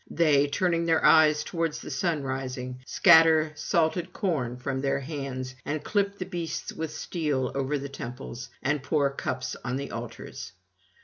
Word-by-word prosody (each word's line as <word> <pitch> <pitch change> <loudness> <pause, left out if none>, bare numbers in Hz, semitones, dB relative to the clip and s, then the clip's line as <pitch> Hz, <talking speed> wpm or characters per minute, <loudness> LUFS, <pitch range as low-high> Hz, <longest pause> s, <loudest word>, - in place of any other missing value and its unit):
They, 145 -4 +3
turning 170 +2 0
their 165 -1 +3
eyes 155 -1 +6
towards 165 -2 -2
the - - -8
sunrising, 130 -6 -2
scatter 160 -1 +6
salted 170 +3 0
corn 130 - -1
from 130 +1 -3
their 135 0 +1
hands 135 -3 -5
and 145 0 -3
clip 200 +1 0
the 185 - -4
beasts 170 -3 -4
with 160 -1 -4
steel 150 -5 -2
over 140 +2 -1
the 140 0 -5
temples, 125 -2 -7
and 145 +1 +1
pour 140 +1 +1
cups 140 - -3
on 125 0 -2
the 140 +1 -4
altars. 115 0 -7
145 Hz, 150 wpm, -27 LUFS, 130-160 Hz, -, eyes